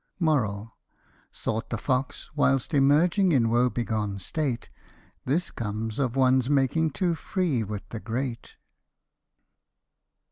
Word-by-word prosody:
Thought 110 +1 -3
the 115 - -2
fox, 130 +3 -2
whilst 140 -1 +2
emerging 160 +7 +4
in 115 -4 +3
woe 120 +2 +3
begone 110 -4 -2
state, 125 - -3 0.3
*' - - -32
This 160 +6 0
comes 110 +1 -4
of 125 -3 0
one's 130 -1 +3
making 145 +3 +2
too 175 +3 0
free 160 - -1
with 105 -1 -6
the 110 - -5
great." 120 +2 -4
130 Hz, 115 wpm, -26 LUFS, 115-145 Hz, 0.3 s, emerging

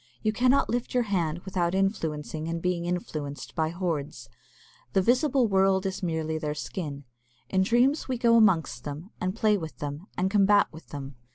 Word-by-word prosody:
You 215 -1 +1
cannot 255 +4 +3
lift 245 +1 -2
your 250 - +4
hand 175 -6 -1
without 185 -2 0
influencing 160 -5 -1
and 165 0 -2
being 175 0 -1
influenced 155 -5 -4
by 160 -2 0
hoards. 155 -9 -3 0.6
The 190 - +4
visible 255 +2 +3
world 190 -1 +3
is 190 0 -3
merely 160 -3 -1
their 150 -1 -3
skin. 150 -2 -5 0.5
In 190 - +3
dreams 245 +9 +2
we 255 -2 -1
go 235 -1 +4
amongst 165 - +3
them, 150 +8 -7
and 185 +2 -1
play 215 -2 +3
with 160 -2 -7
them, 145 +5 -6
and 190 +1 +1
combat 205 0 +5
with 160 - -12
them. 140 -2 -8
180 Hz, 175 wpm, -27 LUFS, 155-210 Hz, 0.6 s, combat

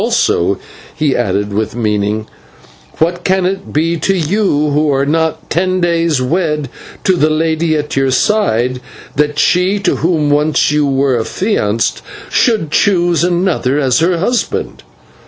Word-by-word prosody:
Also," 90 +3 +1 0.4
he 150 -4 0
added, 100 -2 -1
with 110 +2 -2
meaning, 105 -1 -1 0.7
"what 175 +2 0
can 190 -1 +1
it 190 +1 -3
be 165 +3 0
to 195 +5 0
you, 160 -3 0
who 150 +1 +1
are 135 0 +1
not 160 +2 -1
ten 185 +3 0
days 170 -4 +1
wed 150 0 -1 0.3
to 190 - +3
the 155 -3 +2
lady 160 +1 0
at 150 0 -4
your 135 0 +1
side, 125 - +1 0.3
that 150 0 0
she 180 +5 +2
to 195 -2 0
whom 160 -3 +1
once 150 +1 +2
you 150 -1 +1
were 135 -2 +1
affianced 115 - -1 0.3
should 215 -11 +1
choose 175 -3 +2
another 175 -6 0
as 130 0 +2
her 170 +2 +2
husband?" 235 +8 -2
155 Hz, 145 wpm, -14 LUFS, 135-175 Hz, 0.7 s, to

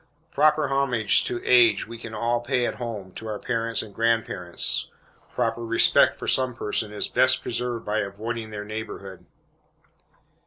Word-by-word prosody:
Proper 150 0 +3
homage 130 -6 +2
to 120 - -2
age 120 -4 +5
we 115 0 -9
can 115 -1 -8
all 120 +2 0
pay 125 0 0
at - - -3
home, 110 -6 -6
to 110 - -8
our 105 -1 -3
parents 115 +2 -2
and 105 -2 -12
grandparents. 115 -6 0 0.4
Proper 115 +1 -1
respect 115 0 +4
for - - -7
some 130 -2 +1
persons 105 -1 -3
is 105 - -1
best 130 0 +3
preserved 120 -1 -3
by 105 +1 0
avoiding 110 +3 -4
their 105 -1 -6
neighborhood. 105 -3 -7
115 Hz, 155 wpm, -25 LUFS, 105-120 Hz, 0.4 s, age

